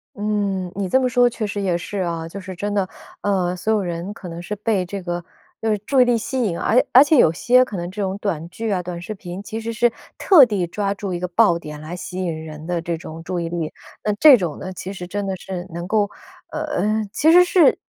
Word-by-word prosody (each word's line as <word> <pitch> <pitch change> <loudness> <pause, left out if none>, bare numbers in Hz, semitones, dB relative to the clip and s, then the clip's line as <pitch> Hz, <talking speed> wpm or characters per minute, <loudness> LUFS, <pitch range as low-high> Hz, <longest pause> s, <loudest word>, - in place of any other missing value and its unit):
嗯， 200 -3 -1
你 195 -1 -2
这 260 - +4
么 255 - +1
说 245 0 +4
确 225 -3 -3
实 205 0 -3
也 180 -3 +1
是 195 +3 -5
啊。 170 -2 -2
就 195 +4 -8
是 185 0 -7
真 205 +3 -3
的， 195 -2 +1 0.3
呃， 185 -3 0
所 215 +5 -1
有 215 -2 +2
人 175 +2 -4
可 205 -4 -10
能 170 0 -7
是 210 +4 -4
被 205 -3 0
这 195 +2 -5
个 175 -1 -4 0.4
就 225 - +1
是 210 - +1
注 270 -2 +4
意 - - +9
力 240 -1 +3
吸 260 +3 -2
引， 175 -6 -1
而 250 +3 +3
而 255 - +9
且 295 +1 +5
有 160 - +6
些 250 +9 +4
可 220 -6 -6
能 175 0 -4
这 205 +3 -5
种 195 0 -2
短 170 -5 -3
剧 225 +5 -4
啊、 185 -2 0
短 175 -1 -6
视 215 +5 -6
频， 185 0 -7
其 220 +2 -6
实 230 - -3
是 235 +1 +2 0.3
特 335 -9 +7
地 200 -7 -1
抓 200 +2 -1
住 200 -2 -5
一 175 - -2
个 180 - -2
爆 180 -1 +4
点 150 -3 -8
来 155 +3 -7
吸 180 +1 -6
引 160 -2 -3
人 155 +1 -9
的 175 -2 -1
这 170 0 -3
种 160 0 -9
注 180 +1 -3
意 170 - -2
力。 165 -2 -3 0.3
那 210 - +1
这 300 -4 +9
种 175 -8 -3
呢， 185 0 -6
其 185 +2 -6
实 180 -2 -7
真 205 +2 -3
的 190 -1 -2
是 180 -1 -6
能 170 +1 -5
够， 205 -1 +2 0.4
呃 290 -9 -1
其 315 +2 +4
实 360 +1 +8
是 355 -2 +4
195 Hz, 275 characters per minute, -21 LUFS, 175-220 Hz, 0.4 s, 意